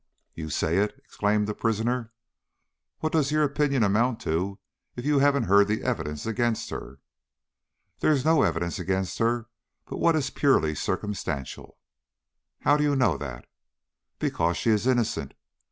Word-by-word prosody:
"You 80 Hz, -1 st, -6 dB
say 80 Hz, +3 st, 0 dB
it!" 105 Hz, +1 st, 0 dB
exclaimed 105 Hz, 0 st, 0 dB
the 105 Hz, -, -2 dB
prisoner. 115 Hz, +2 st, -1 dB, 0.9 s
"What 155 Hz, -, -1 dB
does 150 Hz, -3 st, +2 dB
your 155 Hz, 0 st, +3 dB
opinion 140 Hz, -3 st, +1 dB
amount 110 Hz, +4 st, +2 dB
to 95 Hz, +4 st, -1 dB, 0.4 s
if 120 Hz, -, -6 dB
you 145 Hz, -1 st, +3 dB
haven't 140 Hz, -2 st, +3 dB
heard 100 Hz, -1 st, +5 dB
the 110 Hz, +1 st, -1 dB
evidence 75 Hz, 0 st, -2 dB
against 115 Hz, 0 st, -1 dB
her?" 65 Hz, -, -7 dB, 1.0 s
"There -, -, +3 dB
is 140 Hz, -2 st, +1 dB
no 160 Hz, -2 st, +5 dB
evidence 85 Hz, +2 st, 0 dB
against 95 Hz, +1 st, -2 dB
her 115 Hz, 0 st, +1 dB, 0.4 s
but -, -, -6 dB
what 170 Hz, -1 st, +4 dB
is 140 Hz, -3 st, -1 dB
purely 80 Hz, -, +2 dB
circumstantial." 75 Hz, -7 st, -4 dB, 0.8 s
"How 145 Hz, +1 st, +4 dB
do 150 Hz, -, +1 dB
you 145 Hz, -1 st, +2 dB
know 125 Hz, -, +3 dB
that?" 65 Hz, -4 st, -7 dB, 0.7 s
"Because 85 Hz, +1 st, 0 dB
she 115 Hz, -, +1 dB
is 110 Hz, +3 st, +1 dB
innocent. 120 Hz, -4 st, 0 dB
110 Hz, 155 wpm, -26 LUFS, 95-135 Hz, 1.0 s, heard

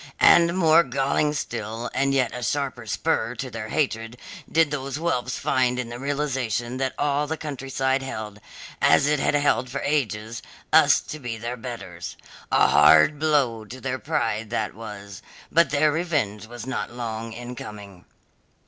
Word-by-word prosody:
And 170 Hz, +1 st, +6 dB
more 165 Hz, -2 st, +6 dB
galling 140 Hz, +2 st, 0 dB
still 115 Hz, -3 st, -4 dB
and 135 Hz, 0 st, +1 dB
yet 130 Hz, -4 st, +1 dB
a 125 Hz, -, -5 dB
sharper 130 Hz, -2 st, -2 dB
spur 120 Hz, 0 st, -1 dB
to 130 Hz, +1 st, -5 dB
their 110 Hz, -1 st, -6 dB
hatred 115 Hz, -4 st, -1 dB, 0.3 s
did 160 Hz, -2 st, +3 dB
those 135 Hz, -2 st, -3 dB
whelps 130 Hz, -6 st, -1 dB
find 125 Hz, -1 st, +1 dB
in 125 Hz, -2 st, -3 dB
the 120 Hz, +1 st, -7 dB
realization 130 Hz, -4 st, -2 dB
that 130 Hz, 0 st, -2 dB
all 145 Hz, 0 st, 0 dB
the 160 Hz, +2 st, -3 dB
countryside 135 Hz, -2 st, -2 dB
held, 110 Hz, -6 st, -6 dB, 0.4 s
as 80 Hz, -, +5 dB
it 150 Hz, 0 st, +2 dB
had -, -, +1 dB
held 145 Hz, -3 st, +2 dB
for 140 Hz, +2 st, -4 dB
ages, 115 Hz, -6 st, -1 dB, 0.3 s
us -, -, +6 dB
to 155 Hz, -, -8 dB
be 120 Hz, -4 st, -5 dB
their 120 Hz, +2 st, -4 dB
betters. 115 Hz, -8 st, -7 dB, 0.3 s
A -, -, +5 dB
hard 75 Hz, -, +6 dB
blow 140 Hz, -8 st, +1 dB
to 130 Hz, +5 st, -9 dB
their 130 Hz, 0 st, -3 dB
pride 115 Hz, -8 st, -1 dB, 0.2 s
was 100 Hz, -3 st, -9 dB
that, -, -, -24 dB, 0.3 s
but 170 Hz, +1 st, +4 dB
their 150 Hz, +1 st, +3 dB
revenge 145 Hz, -, -1 dB
was 120 Hz, +1 st, -8 dB
not 130 Hz, -, -3 dB
long 115 Hz, -1 st, -5 dB
in 120 Hz, +2 st, -7 dB
coming. 100 Hz, -5 st, -10 dB
125 Hz, 165 wpm, -24 LUFS, 115-145 Hz, 0.4 s, And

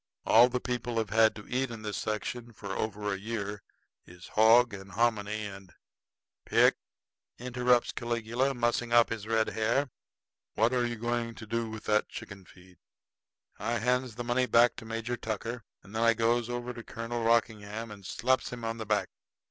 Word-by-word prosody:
All 120 Hz, +2 st, +7 dB
the 125 Hz, 0 st, -1 dB
people 120 Hz, -1 st, -3 dB
have 110 Hz, -3 st, -1 dB
had 110 Hz, 0 st, +5 dB
to 105 Hz, -, -10 dB
eat 130 Hz, +1 st, -1 dB
in 115 Hz, -2 st, -8 dB
this 105 Hz, -1 st, -3 dB
section 115 Hz, +2 st, -4 dB
for 100 Hz, -2 st, -7 dB
over 105 Hz, -1 st, -2 dB
a 95 Hz, -, -4 dB
year 105 Hz, -1 st, -4 dB, 0.5 s
is 90 Hz, -1 st, -13 dB
hog 115 Hz, +1 st, +5 dB
and 95 Hz, -1 st, -9 dB
hominy, 110 Hz, -1 st, 0 dB
and 95 Hz, -2 st, -9 dB, 0.4 s
" -, -, -64 dB
"Pick," -, -, +5 dB, 0.6 s
interrupts 125 Hz, 0 st, +2 dB
Caligula, 120 Hz, +3 st, -1 dB
mussing 120 Hz, 0 st, 0 dB
up 120 Hz, 0 st, +6 dB
his 110 Hz, -2 st, -4 dB
red 110 Hz, 0 st, +2 dB
hair, 120 Hz, +5 st, 0 dB, 0.6 s
"what 115 Hz, +3 st, +3 dB
are 120 Hz, -1 st, +2 dB
you 120 Hz, -, -3 dB
going 120 Hz, 0 st, -2 dB
to 110 Hz, -, -9 dB
do 115 Hz, +1 st, -2 dB
with 110 Hz, -1 st, -7 dB
that 105 Hz, 0 st, +1 dB
chicken 100 Hz, -2 st, -9 dB
feed?" 90 Hz, -1 st, -18 dB, 0.8 s
I 120 Hz, +1 st, -1 dB
hands 125 Hz, +1 st, 0 dB
the 120 Hz, -, -4 dB
money 120 Hz, +1 st, +1 dB
back 120 Hz, 0 st, +5 dB
to -, -, -8 dB
Major 115 Hz, +2 st, -3 dB
Tucker; 115 Hz, +1 st, -4 dB, 0.2 s
and 100 Hz, -, -13 dB
then 110 Hz, -, 0 dB
I 115 Hz, 0 st, +5 dB
goes 115 Hz, +1 st, +1 dB
over 120 Hz, 0 st, -4 dB
to 115 Hz, -, -8 dB
Colonel 115 Hz, +1 st, -4 dB
Rockingham 115 Hz, -1 st, 0 dB
and 100 Hz, -2 st, -11 dB
slaps 130 Hz, +7 st, 0 dB
him 120 Hz, -2 st, -6 dB
on 115 Hz, 0 st, -2 dB
the 110 Hz, -2 st, -6 dB
back. 105 Hz, -1 st, +1 dB
115 Hz, 185 wpm, -30 LUFS, 110-120 Hz, 0.8 s, All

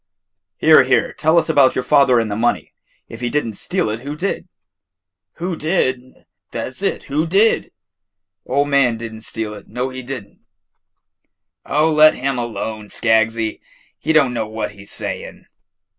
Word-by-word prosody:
"Here, 155 Hz, 0 st, +7 dB
here, 130 Hz, -2 st, +1 dB
tell 160 Hz, +2 st, +2 dB
us 165 Hz, -, +3 dB
about 145 Hz, -5 st, +4 dB
your 130 Hz, -, -1 dB
father 135 Hz, -3 st, +4 dB
and 110 Hz, -2 st, -2 dB
the -, -, -1 dB
money. 115 Hz, +3 st, -1 dB, 0.3 s
If 115 Hz, -, -10 dB
he 120 Hz, -, -1 dB
did 150 Hz, 0 st, 0 dB
n't 110 Hz, -2 st, -6 dB
steal 180 Hz, -, -1 dB
it, 110 Hz, -, -4 dB
who 140 Hz, +4 st, -6 dB
did?" 190 Hz, +6 st, -3 dB, 0.9 s
"Who 175 Hz, +1 st, -4 dB
did? 130 Hz, -6 st, -2 dB, 0.2 s
Tha' -, -, -4 dB
's -, -, -12 dB
it, -, -, -1 dB
who 155 Hz, +4 st, -1 dB
did? 200 Hz, +6 st, +2 dB, 0.8 s
Ol' 140 Hz, +3 st, +1 dB
man 140 Hz, -5 st, +2 dB
di' 115 Hz, -, -6 dB
n' 110 Hz, -1 st, -9 dB
steal 110 Hz, -1 st, -4 dB
it, 105 Hz, -, -12 dB
know 125 Hz, +1 st, -3 dB
he 130 Hz, 0 st, -7 dB
di' 130 Hz, +2 st, -5 dB
n'." 100 Hz, -, -23 dB, 1.3 s
"Oh, 155 Hz, +3 st, +2 dB
let 155 Hz, 0 st, +6 dB
him 135 Hz, -1 st, -2 dB
alone, 110 Hz, -2 st, -4 dB
Skaggsy, 110 Hz, +1 st, +1 dB, 0.4 s
he -, -, -1 dB
don't 140 Hz, -6 st, +4 dB
know 115 Hz, -2 st, -2 dB
what 110 Hz, -1 st, -4 dB
he 100 Hz, -1 st, -14 dB
's -, -, -5 dB
saying." -, -, -5 dB
130 Hz, 175 wpm, -19 LUFS, 115-150 Hz, 1.3 s, Here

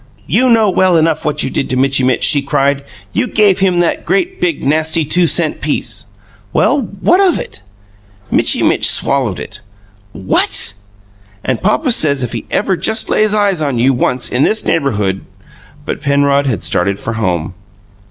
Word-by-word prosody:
"You 255 Hz, +1 st, +1 dB
know 225 Hz, -2 st, +3 dB
well 185 Hz, -2 st, +2 dB
enough 160 Hz, -1 st, 0 dB
what 150 Hz, -1 st, +1 dB
you 130 Hz, -, -3 dB
did -, -, -3 dB
to 130 Hz, -, 0 dB
Mitchy 135 Hz, 0 st, +2 dB
Mitch!" 125 Hz, -1 st, +1 dB
she 145 Hz, -, +5 dB
cried. 140 Hz, 0 st, -1 dB, 0.3 s
"You -, -, -1 dB
gave 205 Hz, -5 st, +2 dB
him 185 Hz, -2 st, +1 dB
that 170 Hz, -, -1 dB
great, 375 Hz, 0 st, -2 dB
big, 170 Hz, -4 st, -1 dB
nasty 155 Hz, +2 st, +1 dB
two 175 Hz, +3 st, +2 dB
cent -, -, +1 dB
piece!" -, -, -3 dB, 0.4 s
"Well, 290 Hz, -, +1 dB, 0.2 s
what 365 Hz, +3 st, +3 dB
of 375 Hz, -3 st, +2 dB
it?" -, -, -7 dB, 0.7 s
"Mitchy -, -, +3 dB
Mitch -, -, +3 dB
swallowed 130 Hz, -9 st, +1 dB
it!" -, -, -9 dB, 0.5 s
"What!" 95 Hz, +1 st, +1 dB, 0.7 s
"And 130 Hz, -3 st, -2 dB
papa 230 Hz, +7 st, 0 dB
says 140 Hz, -, +3 dB
if 120 Hz, -, -4 dB
he -, -, -6 dB
ever 195 Hz, -2 st, 0 dB
just 220 Hz, +4 st, 0 dB
lays 215 Hz, 0 st, +2 dB
eyes 200 Hz, -5 st, +1 dB
on 140 Hz, -5 st, -1 dB
you, 130 Hz, +3 st, +2 dB
once, 125 Hz, 0 st, 0 dB
in 125 Hz, -, -2 dB
this 220 Hz, -, 0 dB
neighbourhood 105 Hz, -11 st, -1 dB, 0.3 s
" -, -, -25 dB
But -, -, -5 dB
Penrod 140 Hz, -1 st, +1 dB
had 125 Hz, -, -2 dB
started 100 Hz, -1 st, -1 dB
for 115 Hz, -, -5 dB
home. 90 Hz, -6 st, -2 dB
145 Hz, 175 wpm, -13 LUFS, 130-195 Hz, 0.7 s, she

